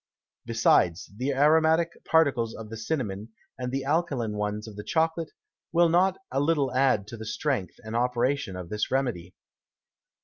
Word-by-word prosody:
Besides, 95 -6 +2
the 130 +5 -2
aromatick 160 +4 +3
Particles 135 -8 +2
of 110 -1 -9
the - - -5
Cinnamon, 110 -4 -3 0.3
and 125 0 -3
the 135 0 -2
alkaline 140 -7 0
ones 105 +1 -3
of 110 - -10
the 105 - -7
Chocolate, 160 +2 0 0.4
will 170 0 +4
not 185 +3 +3
a 135 - 0
little 145 -3 +1
add 130 -6 +2
to 115 - -8
the 110 - -7
Strength 110 - -2
and 110 +1 -6
Operation 125 -1 0
of 90 -2 -7
this 105 0 -2
Remedy. 120 -10 -2
125 Hz, 160 wpm, -27 LUFS, 110-155 Hz, 0.4 s, will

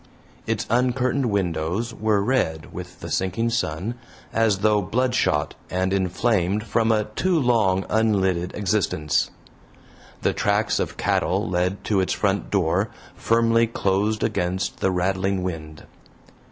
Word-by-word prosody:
Its 110 -1 -1
uncurtained 125 +2 +1
windows 95 +2 -1
were 110 -2 +1
red 100 -10 -1
with - - -9
the - - -6
sinking 95 +5 0
sun, 100 -1 -1 0.4
as 110 -3 +3
though 105 -1 +4
bloodshot 120 -8 0 0.2
and 95 +1 0
inflamed 100 +1 +1
from 115 -1 +1
a 110 -1 +2
too 185 -2 +2
long 110 -8 +2
unlidded 95 -5 +1
existence. 95 -6 0 0.9
The - - +2
tracks 105 +1 +1
of - - -3
cattle - - 0
led 90 +2 -1
to 100 -3 +1
its 95 - +1
front 100 -1 0
door, 90 -5 +1 0.2
firmly 115 0 +2
closed 105 0 0
against 90 +2 -1
the - - +2
rattling 95 +1 0
wind. 80 -4 -6
100 Hz, 125 wpm, -23 LUFS, 90-115 Hz, 0.9 s, though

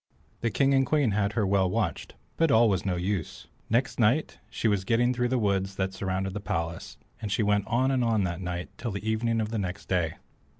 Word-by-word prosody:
The 115 - 0
King 140 +4 +2
and 135 0 +4
Queen 135 -3 +2
had 100 0 0
her 110 -3 +1
well 95 -1 +2
watched, - - -2 0.2
but 165 -1 +2
all 115 -2 +5
was 95 -1 0
no 90 - +1
use. 90 -1 -3 0.2
Next 125 +4 +1
night 120 +8 +2
she - - -1
was 100 -3 +1
getting 120 +5 +2
through 125 0 0
the 130 +1 0
woods 100 -3 0
that 95 0 -2
surrounded 95 0 -2
the 105 - -3
palace, 85 -3 -4 0.2
and 105 -3 -4
she 110 - +1
went 105 -1 +1
on 130 +3 +2
and 130 -2 +1
on 110 -3 +2
that 85 0 -3
night, 90 0 -4
and 100 - -35
till 120 - -3
the 100 +2 -5
evening 115 +1 +1
of 110 +1 -2
next 95 -2 -4
day. 90 -4 0
105 Hz, 225 wpm, -27 LUFS, 95-120 Hz, 0.2 s, all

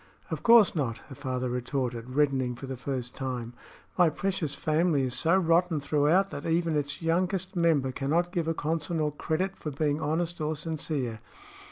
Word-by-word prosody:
"Of - - -3
course 230 -3 +7
not," 130 -7 -1
her - - -8
father 130 -2 -3
retorted, 125 -1 -3
reddening 135 -4 +2
for 135 - -8
the 130 0 -5
first 125 -1 -4
time. 125 -3 -4 0.5
"My 175 -2 +6
precious 170 -3 -2
family 155 -2 +1
is 125 -2 -2
so 165 +8 +3
rotten 170 -2 +2
throughout 150 +7 +2
that 145 - -5
even 165 -1 +1
its 145 +2 -2
youngest 185 +3 0
member 160 -6 +2
cannot 155 +7 0
give 170 -4 -1
a 165 - 0
Consinor 155 -1 -1
credit 185 +6 -1
for 155 - -5
being 150 +1 -1
honest 165 +2 -1
or 155 +1 -1
sincere." 150 -7 -3
150 Hz, 170 wpm, -28 LUFS, 135-170 Hz, 0.5 s, course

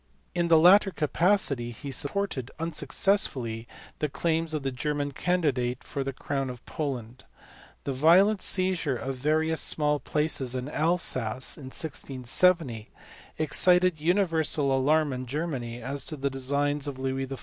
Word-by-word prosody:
In 175 -1 0
the 165 -1 +6
latter 190 +5 +7
capacity 155 -6 +1
he 135 +4 -7
supported 140 -3 -2
(unsuccessfully) 135 - 0 0.3
the 150 - -1
claims 160 +2 -1
of 150 - -3
the 135 - -1
German 145 +3 -2
candidate 135 -7 0
for 140 - -4
the 135 - -3
crown 135 0 -3
of 125 -1 -9
Poland. 130 -6 -5 0.6
The 140 - -2
violent 180 +9 +5
seizure 185 -7 0
of 135 +3 -4
various 155 +4 +1
small 150 -1 +1
places 140 -3 -1
in 130 +1 -3
Alsace 130 -7 0
in 140 - -11
1670 135 -2 0 0.5
excited 180 +1 +3
universal 160 -5 +2
alarm 145 +2 +2
in 130 0 -5
Germany 125 -5 -4
as 135 +2 -3
to 155 - -5
the 140 0 -1
designs 140 +2 -1
of 140 -2 -5
Louis 135 0 -2
XIY. 135 -1 -6
145 Hz, 140 wpm, -27 LUFS, 130-165 Hz, 0.6 s, latter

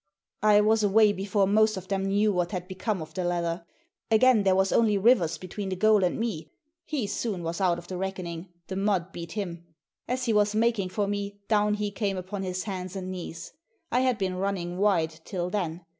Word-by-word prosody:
I 210 0 +6
was 220 +1 +3
away 210 +1 +5
before 195 +1 +1
most 215 +1 +3
of 185 0 -7
them 195 0 -1
knew 205 +2 +2
what 175 0 -1
had 180 -1 -4
become 190 -1 -3
of 155 0 -13
the 185 - -2
leather. 170 -1 -2 0.4
Again 225 0 +5
there 190 -1 +3
was 190 0 +2
only 215 -3 +3
Rivers 190 -7 +3
between 190 +3 -6
the 185 - -2
goal 215 +1 +4
and 180 - 0
me. 205 -9 -3 0.4
He 285 -8 -2
soon 200 -2 -3
was 165 +3 -3
out 180 -2 +3
of 175 0 -10
the 185 - -5
reckoning. 185 -2 -5 0.2
The 190 - -5
mud 195 -3 0
beat 170 -2 -7
him. 175 -5 -4 0.4
As 250 0 -1
he 230 - +1
was 210 0 +2
making 220 -4 +1
for 205 +2 -1
me 205 0 -3
down 210 -1 +2
he 210 -1 -2
came 200 -1 -2
upon 190 +2 -5
his 185 -1 -3
hands 185 -2 -5
and 185 -1 -4
knees. 170 -2 -7 0.4
I 250 - +3
had 255 -2 +2
been 185 -2 -2
running 185 -2 -2
wide 165 -6 +1
till 180 -1 -3
then. 175 -4 -3
195 Hz, 210 wpm, -27 LUFS, 180-210 Hz, 0.4 s, I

